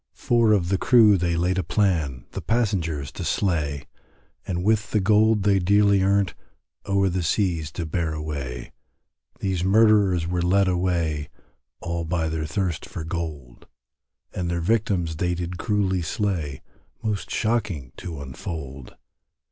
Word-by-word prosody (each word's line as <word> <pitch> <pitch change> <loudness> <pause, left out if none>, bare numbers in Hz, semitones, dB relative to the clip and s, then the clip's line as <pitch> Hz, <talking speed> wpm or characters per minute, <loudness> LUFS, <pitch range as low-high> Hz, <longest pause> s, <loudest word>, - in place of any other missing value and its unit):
Four 115 -2 +3
of 90 -4 +1
the 95 -1 +1
crew 115 -5 +6
they 85 -2 0
laid 90 +2 +1
a - - 0
plan, 80 - 0
The - - -5
passengers 90 - -1
to - - -6
slay, 75 -7 -1 0.6
And 90 -1 -2
with 110 +1 +1
the 105 - +1
gold 105 +1 +3
they 100 -1 +3
dearly 100 +1 +4
earnt, 100 0 +2 0.5
O'er 100 0 +2
the 90 0 -1
seas 85 -3 0
to 85 - -4
bear 80 0 -1
away; 70 -6 -5 0.7
These 95 -3 -1
murderers 100 -3 +4
were 90 0 -1
led 95 +3 +3
away, 85 -5 0 0.5
All 85 0 -3
by 80 -1 -1
their 80 -1 -3
thirst 85 +2 -2
for 80 - -6
gold, 80 -7 -6 0.7
And 90 -1 -3
their 85 0 -1
victims 90 -4 0
they 90 +1 0
did 90 0 -5
cruelly 95 -3 0
slay, 85 - -2 0.4
Most 105 -3 -2
shocking 105 - -1
to 80 -5 -7
unfold. 70 -1 -7
90 Hz, 145 wpm, -24 LUFS, 80-100 Hz, 0.7 s, crew